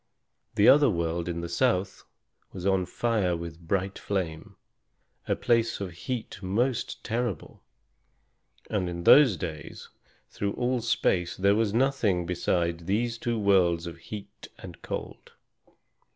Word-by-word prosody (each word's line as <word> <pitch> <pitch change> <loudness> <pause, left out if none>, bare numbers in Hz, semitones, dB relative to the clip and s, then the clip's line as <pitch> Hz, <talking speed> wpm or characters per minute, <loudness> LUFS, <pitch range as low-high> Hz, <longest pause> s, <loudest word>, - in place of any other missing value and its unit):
The 105 - +4
other 145 0 +7
world 85 -2 -1
in 85 0 -3
the 85 - -4
south 95 +1 0 0.5
was 90 -1 -7
on 95 -2 +2
fire 105 -7 0
with 85 -1 -8
bright 95 +1 -1
flame, 85 -6 -4 0.7
a - - +1
place 115 -1 +1
of 95 -3 -4
heat 110 +4 -5
most 115 +6 -1
terrible. 115 -5 -3 1.1
And 95 -4 -1
in 85 0 -5
those 130 - +7
days 80 -3 -7 0.4
through 100 0 -2
all 125 0 0
space 90 -6 0
there 100 +1 +4
was 110 -1 +1
nothing 115 -7 +1
beside 85 -1 -1
these 115 +4 0
two 120 -1 -1
worlds 90 -5 +3
of 85 -1 -8
heat 100 +4 -9
and - - -11
cold. - - -7
95 Hz, 135 wpm, -27 LUFS, 85-115 Hz, 1.1 s, other